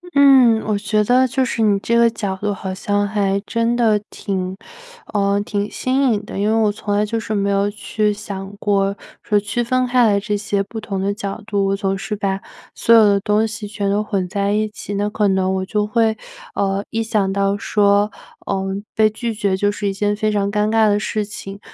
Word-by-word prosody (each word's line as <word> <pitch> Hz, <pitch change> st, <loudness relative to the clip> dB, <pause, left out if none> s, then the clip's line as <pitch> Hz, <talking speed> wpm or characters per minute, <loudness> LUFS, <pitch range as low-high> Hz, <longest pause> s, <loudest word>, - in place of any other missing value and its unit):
嗯， 260 Hz, -5 st, +6 dB
我 210 Hz, -1 st, 0 dB
觉 210 Hz, +1 st, +1 dB
得 250 Hz, +4 st, +4 dB
就 260 Hz, +1 st, 0 dB
是 235 Hz, -2 st, -2 dB
你 210 Hz, -2 st, +3 dB
这 235 Hz, +3 st, +1 dB
个 235 Hz, 0 st, +5 dB
角 200 Hz, -4 st, -3 dB
度 205 Hz, +1 st, -2 dB
好 190 Hz, -1 st, -5 dB
像 205 Hz, +1 st, 0 dB
还 200 Hz, -1 st, 0 dB
真 230 Hz, +1 st, 0 dB
的 220 Hz, -3 st, +3 dB
挺 185 Hz, -2 st, -4 dB, 0.6 s
呃， 200 Hz, -1 st, +2 dB
挺 205 Hz, 0 st, -2 dB
新 260 Hz, -1 st, +1 dB
颖 210 Hz, -1 st, -2 dB
的。 195 Hz, -, -6 dB
因 205 Hz, -, +1 dB
为 220 Hz, -, +2 dB
我 220 Hz, -2 st, +3 dB
从 205 Hz, 0 st, -3 dB
来 210 Hz, +1 st, +2 dB
就 225 Hz, +2 st, -2 dB
是 215 Hz, -1 st, -3 dB
没 200 Hz, 0 st, 0 dB
有 200 Hz, +1 st, +1 dB
去 210 Hz, 0 st, -1 dB
想 200 Hz, -1 st, -7 dB
过， 200 Hz, -2 st, +1 dB, 0.3 s
说 210 Hz, -, +2 dB
区 210 Hz, +4 st, -2 dB
分 255 Hz, +2 st, +1 dB
开 250 Hz, -1 st, +3 dB
来 205 Hz, -2 st, +3 dB
这 205 Hz, +1 st, -2 dB
些 200 Hz, -1 st, -1 dB
不 220 Hz, +3 st, -7 dB
同 200 Hz, -3 st, -4 dB
的 200 Hz, +1 st, 0 dB
角 200 Hz, +1 st, -5 dB
度， 205 Hz, -2 st, 0 dB
我 195 Hz, 0 st, +1 dB
总 195 Hz, -1 st, -1 dB
是 210 Hz, +2 st, -4 dB
把 195 Hz, -1 st, -1 dB, 0.3 s
所 230 Hz, -, +4 dB
有 225 Hz, -, +8 dB
的 200 Hz, -1 st, +4 dB
东 210 Hz, +2 st, +1 dB
西 220 Hz, -1 st, -5 dB
全 200 Hz, -1 st, -2 dB
都 205 Hz, +1 st, +1 dB
混 200 Hz, -4 st, -2 dB
在 200 Hz, +2 st, 0 dB
一 215 Hz, 0 st, 0 dB
起， 205 Hz, -1 st, -7 dB
那 205 Hz, +1 st, 0 dB
可 210 Hz, 0 st, +1 dB
能 190 Hz, -1 st, +1 dB
我 190 Hz, 0 st, -2 dB
就 210 Hz, +2 st, 0 dB
会， 220 Hz, 0 st, +1 dB, 0.4 s
呃， 195 Hz, 0 st, 0 dB
一 225 Hz, 0 st, -1 dB
想 210 Hz, -3 st, 0 dB
到 200 Hz, 0 st, +1 dB
说， 205 Hz, -1 st, +2 dB, 0.4 s
呃， 195 Hz, -1 st, -1 dB, 0.3 s
被 215 Hz, 0 st, +4 dB
拒 230 Hz, +2 st, -4 dB
绝 200 Hz, -2 st, 0 dB
就 205 Hz, +1 st, +1 dB
是 205 Hz, 0 st, -3 dB
一 -, -, -2 dB
件 205 Hz, +1 st, 0 dB
非 215 Hz, +1 st, 0 dB
常 200 Hz, -1 st, 0 dB
尴 210 Hz, +1 st, 0 dB
尬 220 Hz, -1 st, +4 dB
的 205 Hz, 0 st, +3 dB
事 215 Hz, 0 st, -2 dB
情， 200 Hz, -1 st, -8 dB
205 Hz, 240 characters per minute, -19 LUFS, 200-220 Hz, 0.6 s, 有